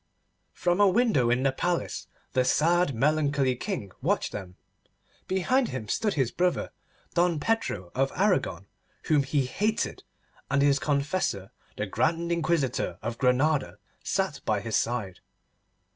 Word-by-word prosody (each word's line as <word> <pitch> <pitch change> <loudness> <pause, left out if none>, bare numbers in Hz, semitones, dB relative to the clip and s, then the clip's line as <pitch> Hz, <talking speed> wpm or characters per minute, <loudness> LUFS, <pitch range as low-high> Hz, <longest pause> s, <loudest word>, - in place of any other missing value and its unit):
From 175 +2 +1
a 205 - +7
window 195 - +3
in 125 +2 +2
the 135 - +3
palace 175 +6 -2 0.3
the 130 - +3
sad 165 +2 +2
melancholy 145 0 +2
King 125 - -4
watched - - 0
them. 95 -3 -7 0.7
Behind 240 +8 +2
him 120 -5 -5
stood 210 - 0
his 130 -5 +1
brother, 180 0 0 0.4
Don 170 -2 +2
Pedro 145 - -1
of 135 +1 +1
Aragon, 180 - +1 0.4
whom 150 -2 +3
he 140 0 0
hated, 210 +12 -1 0.5
and 140 +1 +2
his 140 0 +4
confessor, 140 - -1 0.3
the 105 - -1
Grand 165 - 0
Inquisitor 145 - 0
of 115 +1 -4
Granada, 135 +3 +2 0.3
sat - - -1
by - - +1
his 115 -2 -3
side. 115 -6 -1
145 Hz, 135 wpm, -27 LUFS, 125-175 Hz, 0.7 s, a